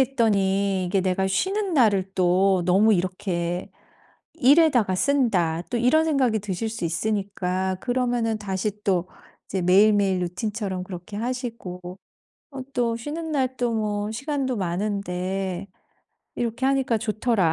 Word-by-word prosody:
했더니 200 Hz, -6 st, +1 dB
이게 190 Hz, +2 st, +1 dB
내가 190 Hz, +1 st, 0 dB
쉬는 380 Hz, -, 0 dB
날을 200 Hz, -8 st, +3 dB
또 185 Hz, +1 st, +3 dB
너무 200 Hz, +5 st, +4 dB
이렇게 180 Hz, -1 st, -2 dB, 0.6 s
일에다가 265 Hz, -, +4 dB
쓴다.' 185 Hz, -, +1 dB
또 245 Hz, -, 0 dB
이런 255 Hz, +7 st, +4 dB
생각이 265 Hz, -8 st, +2 dB
드실 205 Hz, +2 st, -3 dB
수 220 Hz, -4 st, -6 dB
있으니까 190 Hz, 0 st, -1 dB
그러면은 245 Hz, -3 st, 0 dB
다시 210 Hz, +1 st, -3 dB
또 185 Hz, -2 st, +1 dB, 0.4 s
이제 190 Hz, -, -3 dB
매일매일 195 Hz, +1 st, +4 dB
루틴처럼 190 Hz, +1 st, -3 dB
그렇게 180 Hz, +2 st, -8 dB
하시고 230 Hz, -6 st, -4 dB, 0.7 s
어 270 Hz, -, -6 dB
또 235 Hz, -2 st, +1 dB
쉬는 310 Hz, +6 st, -5 dB
날 260 Hz, -2 st, 0 dB
또 245 Hz, -1 st, 0 dB
뭐 210 Hz, -1 st, -1 dB
'시간도 270 Hz, +1 st, -2 dB
많은데 190 Hz, 0 st, -2 dB, 0.7 s
이렇게 240 Hz, +2 st, -1 dB
하니까 265 Hz, -4 st, +1 dB
좋더라.' 215 Hz, -5 st, +1 dB
205 Hz, 275 characters per minute, -24 LUFS, 185-245 Hz, 0.7 s, 너무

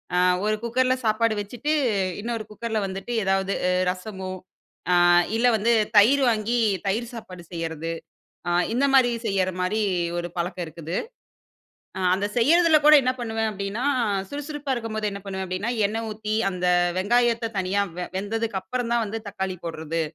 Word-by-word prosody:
அ -, -, +2 dB, 0.3 s
ஒரு 215 Hz, 0 st, +2 dB
குக்கர்ல 255 Hz, +2 st, +2 dB
சாப்பாடு 220 Hz, +1 st, +2 dB
வெச்சுட்டு, 245 Hz, +9 st, -3 dB, 0.5 s
இன்னொரு 230 Hz, -1 st, -3 dB
குக்கர்ல 220 Hz, +1 st, -3 dB
வந்துட்டு 195 Hz, +5 st, -5 dB
ஏதாவது 195 Hz, 0 st, +1 dB, 0.4 s
ரசமோ, 190 Hz, 0 st, -7 dB, 0.6 s
ஆ -, -, +5 dB, 0.4 s
இல்ல 245 Hz, -, +3 dB
வந்து 230 Hz, +3 st, +2 dB, 0.2 s
தயிர் 265 Hz, +7 st, +6 dB
வாங்கி 230 Hz, +2 st, 0 dB, 0.3 s
தயிர் 230 Hz, +5 st, -1 dB
சாப்பாடு 185 Hz, -6 st, -9 dB
செய்றது. 165 Hz, -1 st, -4 dB, 0.6 s
ஆ -, -, +1 dB, 0.2 s
இந்த 255 Hz, +4 st, +1 dB
மாரி 255 Hz, -3 st, +5 dB
செய்ற 195 Hz, -3 st, +1 dB
மாரி 205 Hz, +4 st, 0 dB, 0.4 s
ஒரு 175 Hz, 0 st, -3 dB
பழக்கம் 175 Hz, +1 st, -2 dB
இருக்குது. 165 Hz, +2 st, -6 dB, 1.0 s
ஆ -, -, -3 dB
அந்த 195 Hz, +2 st, 0 dB
செய்றதுல 320 Hz, +5 st, +5 dB
கூட 305 Hz, -, +9 dB
என்ன 255 Hz, -, +1 dB
பண்ணுவேன் 225 Hz, -1 st, -1 dB
அப்டீனா, 200 Hz, +4 st, -4 dB, 0.5 s
சுறுசுறுப்பா 290 Hz, -1 st, -4 dB
இருக்கும்போது 220 Hz, -3 st, -3 dB
என்ன 200 Hz, -, -6 dB
பண்ணுவேன் 190 Hz, -1 st, -4 dB
அப்டீனா, 185 Hz, +5 st, -2 dB, 0.2 s
எண்ணெய் 225 Hz, +2 st, -2 dB
ஊத்தி 215 Hz, 0 st, -3 dB
அந்த 180 Hz, -1 st, -3 dB, 0.3 s
வெங்காயத்த 230 Hz, +3 st, +2 dB
தனியா 190 Hz, +2 st, +1 dB, 0.2 s
வெ 180 Hz, -, -3 dB
வெந்ததுக்கப்புறம் 225 Hz, +3 st, -3 dB
தான் 235 Hz, -1 st, +2 dB
வந்து 225 Hz, +2 st, -4 dB
தக்காளி 190 Hz, -1 st, -3 dB
போடுறது. 165 Hz, 0 st, -3 dB
215 Hz, 145 wpm, -24 LUFS, 190-235 Hz, 1.0 s, கூட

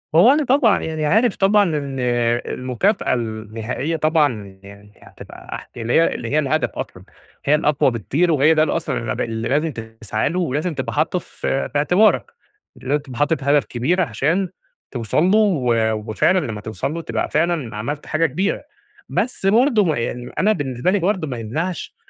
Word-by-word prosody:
هو 185 Hz, +11 st, +7 dB
أنا 300 Hz, +2 st, +2 dB
طبعًا 250 Hz, -6 st, +4 dB
يعني 155 Hz, -1 st, -2 dB
عارف 220 Hz, +8 st, +3 dB
طبعًا 205 Hz, +2 st, +4 dB
إن 140 Hz, -2 st, -4 dB
المكافأة 125 Hz, -, 0 dB
النهائية 115 Hz, +5 st, -3 dB
طبعًا 145 Hz, -, 0 dB
يعني 100 Hz, +1 st, -14 dB
هتبقى -, -, -10 dB
اح -, -, -10 dB
اللي 120 Hz, 0 st, -2 dB
هي 165 Hz, -, +3 dB
اللي 115 Hz, -, -5 dB
هي 150 Hz, -, +2 dB
الهدف 155 Hz, +1 st, 0 dB
أصلًا، -, -, -7 dB, 0.4 s
هي 145 Hz, -, +4 dB
الأقوى 150 Hz, -3 st, +2 dB
بكتير، 145 Hz, -, 0 dB
وهي 150 Hz, +2 st, +4 dB
ده 155 Hz, -1 st, +3 dB
الأصلًا 130 Hz, -8 st, -2 dB
الب -, -, -2 dB
لازم 120 Hz, +8 st, -1 dB
تسعى 110 Hz, -1 st, -3 dB
له 175 Hz, +4 st, -2 dB
ولازم 155 Hz, +1 st, -1 dB
تبقى 130 Hz, -3 st, -4 dB
حاطه 160 Hz, +4 st, +1 dB
ف -, -, -16 dB, 0.2 s
في 135 Hz, -, -1 dB
اعتبارك، 180 Hz, +9 st, +3 dB, 0.4 s
لازم 140 Hz, +3 st, -1 dB
تبقى 130 Hz, -4 st, -9 dB
حاطط 145 Hz, -1 st, +1 dB
هدف 140 Hz, 0 st, +3 dB
كبير 145 Hz, +10 st, 0 dB
عشان 165 Hz, -, 0 dB, 0.4 s
توصل 120 Hz, +4 st, 0 dB
له، 190 Hz, +4 st, +4 dB
و 125 Hz, -, +2 dB, 0.2 s
وفعلًا 185 Hz, -, +3 dB
لما 110 Hz, -10 st, -4 dB
توصل 110 Hz, +7 st, -4 dB
له 165 Hz, -, -4 dB
تبقى -, -, -3 dB
فعلًا 155 Hz, -7 st, 0 dB
عملت 145 Hz, +8 st, -4 dB
حاجة 155 Hz, +1 st, +1 dB
كبيرة، 180 Hz, +8 st, -1 dB, 0.5 s
بس 230 Hz, -3 st, -2 dB
برضو 225 Hz, +1 st, +4 dB
م 160 Hz, -, +2 dB
يعني 120 Hz, +1 st, -4 dB
أنا 210 Hz, +3 st, +4 dB
بالنسبة 135 Hz, -, -1 dB
لي 205 Hz, -, +2 dB
برضو 185 Hz, -2 st, 0 dB
ما 125 Hz, -3 st, -4 dB
يمنعش 155 Hz, +10 st, -4 dB
145 Hz, 170 wpm, -20 LUFS, 120-175 Hz, 0.5 s, هو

